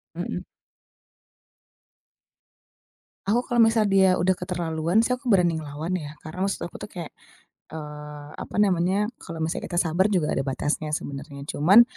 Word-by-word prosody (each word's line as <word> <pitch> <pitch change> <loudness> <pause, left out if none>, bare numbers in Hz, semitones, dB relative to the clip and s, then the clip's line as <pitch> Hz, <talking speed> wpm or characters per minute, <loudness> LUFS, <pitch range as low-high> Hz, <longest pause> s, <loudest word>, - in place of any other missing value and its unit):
Mhm. - - -3 2.8
Aku 225 +4 +4
kalau 240 -1 +5
misal 225 -1 +4
dia 190 -2 +4
udah 185 +1 +3
keterlaluan 175 +1 0
sih 250 +2 +3
aku 250 -2 -2
berani 175 -4 +4
ngelawan 155 +3 -3
ya 150 -4 -4
karena 165 +4 -5
maksud 195 -3 -1
aku - - -20
tuh - - -7
kayak, 170 -3 -6 0.6
eee, 150 -1 -8
apa - - -8
namanya, 195 +3 +2
kalau 165 -1 -5
misalnya 160 - -2
kita 175 - -5
sabar 175 +5 +3
juga 180 -7 +1
ada - - 0
batasnya 145 +3 -1
sebenarnya 140 0 -6
cuman 195 +11 +7
175 Hz, 145 wpm, -25 LUFS, 150-195 Hz, 2.8 s, cuman